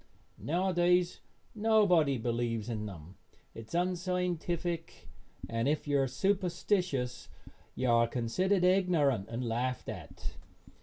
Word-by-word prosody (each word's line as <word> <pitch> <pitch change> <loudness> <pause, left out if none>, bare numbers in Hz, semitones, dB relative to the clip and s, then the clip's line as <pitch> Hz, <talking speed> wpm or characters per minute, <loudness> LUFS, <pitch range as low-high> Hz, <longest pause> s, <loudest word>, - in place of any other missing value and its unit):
Nowadays 180 +1 +2 0.3
nobody 205 - +3
believes 115 -1 -2
in 105 -2 -3
them. 90 -2 -10 0.4
It 115 -1 -9
is - - -7
unscientific, 175 -2 -2 0.4
and 115 +2 -1
if 150 +1 0
you 145 -1 +2
are 135 - +1
superstitious 175 -3 -1 0.5
you 130 - -1
are 115 0 +4
considered 180 - 0
ignorant 170 - +3
and 120 +1 -3
laughed 125 +3 -2
at. - - -7
155 Hz, 110 wpm, -31 LUFS, 120-180 Hz, 0.5 s, are